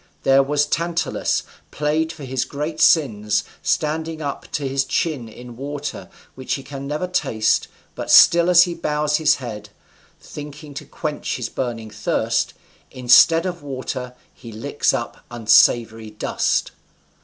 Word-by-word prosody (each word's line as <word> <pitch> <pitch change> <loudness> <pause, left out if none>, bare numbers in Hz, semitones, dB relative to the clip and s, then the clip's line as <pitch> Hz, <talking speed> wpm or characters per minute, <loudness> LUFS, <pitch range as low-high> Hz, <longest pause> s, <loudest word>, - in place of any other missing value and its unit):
There 135 0 +5
was 145 +2 +1
Tantalus, 170 +2 -1 0.3
plagued 155 +2 -1
for 160 -3 -11
his 130 -1 -2
great 150 +2 -5
sins, 105 -11 +3 0.2
standing 160 +1 -1
up 145 -3 -6
to 145 -2 -2
his 135 +1 0
chin 135 -3 -2
in 120 +2 -11
water, 145 +2 -6 0.2
which 130 0 -3
he 135 - -7
can 140 0 -7
never 150 +5 -2
taste, 110 -12 0 0.3
but - - -6
still 170 +1 +7
as 175 -1 +8
he 175 -1 -3
bows 150 -2 0
his 150 -1 +3
head, 105 -5 -8 0.5
thinking 150 0 -10
to - - -7
quench - - -4
his - - -4
burning 115 -4 -4
thirst, 105 - -1 0.3
instead 130 +7 +5
of 180 -2 -4
water 130 -2 -5 0.2
he 115 -2 -12
licks 110 +1 0
up - - -5
unsavory 115 -1 +3
dust. 105 - -1
140 Hz, 145 wpm, -21 LUFS, 120-155 Hz, 0.5 s, as